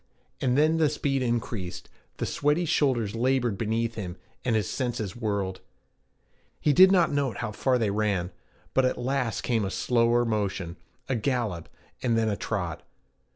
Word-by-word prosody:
And 125 0 +2
then 155 +2 +4
the 155 -2 +3
speed 140 -2 -1
increased, 115 -6 -3 0.3
the - - -2
sweaty 150 +4 +1
shoulders 125 -9 +1
labored 120 -1 +1
beneath 115 +2 -1
him, 90 -5 -6 0.3
and 120 -3 +1
his 105 -4 +1
senses 120 -7 -3
whirled. 100 -5 -2 1.0
He 150 - +3
did 185 +6 +8
not 180 -5 +4
note 140 -6 0
how 120 -3 -3
far 130 +4 +1
they 110 -4 +1
ran; 100 -4 0 0.4
but 130 - +4
at 130 - +1
last 130 -2 -1
came 115 -3 0
a 95 - -1
slower 120 +3 +2
motion, 100 -6 -2 0.3
a 130 - 0
gallop, 115 - -1 0.3
and 115 -3 +1
then 110 -1 +2
a 105 - 0
trot. 90 -7 -3
115 Hz, 160 wpm, -27 LUFS, 105-130 Hz, 1.0 s, did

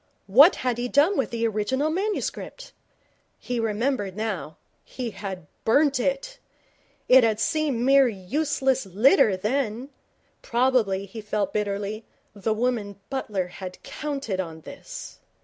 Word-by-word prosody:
What 270 - +7
had 245 -2 0
he 245 - -1
done 295 +10 +3
with 265 - 0
the 230 -1 -1
original 260 +8 0
manuscript? 425 +6 -3 0.6
He 245 -1 -3
remembered 220 -2 -1
now. 205 -8 -4 0.3
He 245 -3 -5
had 190 -5 -7 0.2
burnt 280 +3 +3
it. 275 - -2 0.7
It 255 0 +7
had 220 -2 +2
seemed 295 -2 0
mere 270 +1 +5
useless 265 +4 -1
litter 210 - +4
then. 245 +4 -2 0.5
Probably, 235 -6 +1
he 220 +3 -9
felt 210 0 -2
bitterly, 205 +1 -2 0.3
the 210 +2 -2
woman 215 -3 -1
Butler 210 -8 -2 0.2
had 185 -1 -8
counted 275 -10 -4
on 165 -3 -5
this. - - -10
235 Hz, 130 wpm, -25 LUFS, 205-275 Hz, 0.7 s, What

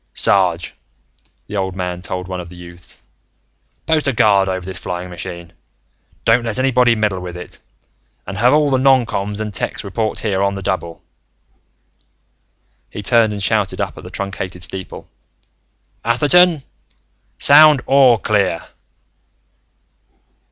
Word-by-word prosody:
"Sarge," 90 -4 +1 0.7
the 105 - -8
old 95 -2 -2
man 90 -1 -4
told 90 0 -5
one 90 -1 -5
of 85 - -10
the 90 - -13
youths, 85 0 -11 0.8
"post 160 -2 +1
a 140 - +1
guard 100 -3 +3
over 95 -1 -3
this 95 -1 -6
flying 90 0 -5
machine. 85 -1 -8 0.7
Don't 115 +2 +4
let 115 -3 -3
anybody 125 -2 +3
meddle 105 -4 -1
with 90 -1 -7
it. 90 - -10 0.7
And 100 - -6
have 120 +5 +3
all 150 -1 +3
the 130 - +2
noncoms 115 -6 +1
and 105 -1 -4
techs - - -3
report 110 +2 -3
here, 100 -3 -1
on 100 0 0
the 95 - -6
double." 85 -3 -4 1.9
He 105 - -8
turned 115 +2 +3
and 100 -1 -4
shouted - - 0
up - - -3
at - - -11
the - - -9
truncated 95 -2 -5
steeple: 95 +2 -7 1.0
"Atherton, 150 +6 +3 0.7
sound 150 -1 +6
'All 135 -4 +5
Clear!'" 100 -5 0
100 Hz, 135 wpm, -18 LUFS, 90-120 Hz, 1.9 s, sound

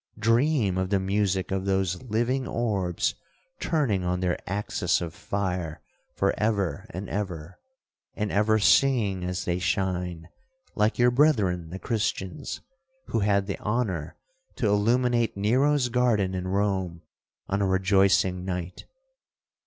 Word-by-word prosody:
—Dream 115 -3 +2
of 95 0 -1
the 100 -1 +2
music 95 -1 0
of 95 0 -1
those 95 -2 0
living 125 +2 -1
orbs 100 -7 -1 0.5
turning 125 - 0
on 90 0 -1
their 90 -1 0
axis 100 +2 0
of 85 -2 -5
fire 90 -6 -3 0.4
for - - +1
ever 100 -8 0
and 95 +3 -6
ever, 90 -5 -5 0.6
and 105 -1 -2
ever 105 +2 +3
singing 110 -4 +3
as 90 0 -3
they 90 0 0
shine, 90 -3 -2 0.5
like 105 +1 +1
your 125 0 +4
brethren 105 - +2
the 90 - -6
Christians, 100 -3 -3 0.5
who 115 - 0
had 100 -1 +2
the 100 - -4
honour 100 -9 -2 0.4
to 120 - -2
illuminate 115 +2 +2
Nero's 130 +6 +2
garden 115 -6 +2
in 90 0 -3
Rome 95 -3 -1 0.4
on 100 +1 -1
a 100 - +2
rejoicing 95 -1 +3
night.' 90 -1 -5
100 Hz, 130 wpm, -26 LUFS, 90-115 Hz, 0.6 s, your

